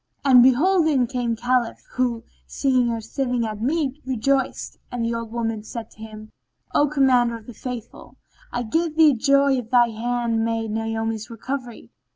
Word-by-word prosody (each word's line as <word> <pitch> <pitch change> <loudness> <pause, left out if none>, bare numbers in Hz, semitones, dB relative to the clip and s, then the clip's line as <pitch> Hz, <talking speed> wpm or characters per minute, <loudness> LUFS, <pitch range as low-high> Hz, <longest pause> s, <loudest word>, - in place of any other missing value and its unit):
And 255 -3 +7
behold 315 +8 +4
in 270 -5 +2
came 240 -2 -2
the - - -20
Caliph 245 -2 0
who, 245 -3 -1 0.2
seeing 255 -3 +1
her 230 -1 -2
sitting 245 +1 -2
at 215 -1 -5
meat, 285 +2 -1
rejoiced; 265 +1 -1
and 245 -2 -2
the 230 - -1
old 230 -1 -5
woman 225 -2 -2
said 225 +1 -8
to - - -21
him, 215 -1 -10 0.4
"O 290 - +4
Commander 255 -5 +2
of 220 - -16
the 245 - -10
Faithful, 240 -1 -8 0.3
I 245 - -2
give 320 +7 -1
thee 315 -2 +6
joy 275 +2 +3
of 230 -2 -8
thy 240 -1 +4
hand 230 0 -1
maid 225 -1 -2
Naomi's 225 0 -3
recovery! 245 +1 -6
240 Hz, 175 wpm, -23 LUFS, 225-265 Hz, 0.4 s, And